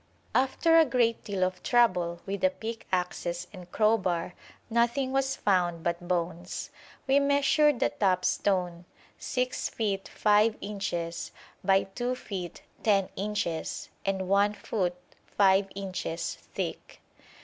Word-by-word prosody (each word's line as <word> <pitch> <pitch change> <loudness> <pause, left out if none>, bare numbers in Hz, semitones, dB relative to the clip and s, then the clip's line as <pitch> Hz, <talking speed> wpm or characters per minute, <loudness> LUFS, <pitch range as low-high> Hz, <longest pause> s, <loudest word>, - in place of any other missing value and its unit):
After 325 +6 +4
a - - +8
great 240 -4 +1
deal 195 -3 -1
of 185 0 -1
trouble 180 -8 +2
with 200 0 -4
the 280 - +5
pickaxes 180 -8 -3
and 180 -2 -11
crowbar 190 -6 +1 0.3
nothing 240 +3 +1
was 270 0 +1
found 175 -6 +1
but 170 +1 -2
bones. 175 0 -3 0.3
We 270 +1 +4
measured 285 0 +3
the - - +3
top 185 -3 +1
stone, 180 -3 0 0.3
6 255 -1 -1
feet 200 -3 -2
5 210 +1 +3
inches 195 -5 -4 0.3
by 195 0 +4
2 245 +6 -3
feet 185 -8 -6 0.2
10 200 -3 +2
inches 200 -5 -3
and 190 -1 -1
1 200 +2 +3
foot 185 -4 -2 0.4
5 195 0 +5
inches 185 -4 -3
thick. - - -6
195 Hz, 125 wpm, -28 LUFS, 180-235 Hz, 0.4 s, a